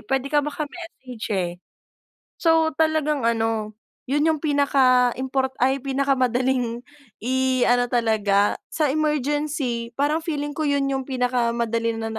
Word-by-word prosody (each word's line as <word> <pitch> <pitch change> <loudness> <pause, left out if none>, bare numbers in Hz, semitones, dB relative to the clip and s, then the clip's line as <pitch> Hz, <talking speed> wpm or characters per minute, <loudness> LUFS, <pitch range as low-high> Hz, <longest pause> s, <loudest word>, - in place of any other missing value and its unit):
puwede 270 +3 -1
ka 295 - +4
maka-message 295 -5 -7
eh. 180 -3 -1 0.9
So 325 -1 +3
talagang 310 -4 +1
ano, 225 -2 -1 0.4
yun 295 +2 +1
yung 310 -2 +1
pinaka-import 265 -2 +2
ay 265 +2 +2
pinakamadaling 255 -3 0 0.4
i-ano 255 -1 +2
talaga 210 -4 +2 0.2
sa 305 -3 +1
emergency 290 -5 -1
parang 295 +3 +1
feeling 295 -2 -3
ko 310 - -1
yun 285 -1 +1
yung 270 -1 -2
pinakamadali 235 -2 0
na 225 0 -3
265 Hz, 115 wpm, -23 LUFS, 235-295 Hz, 0.9 s, ka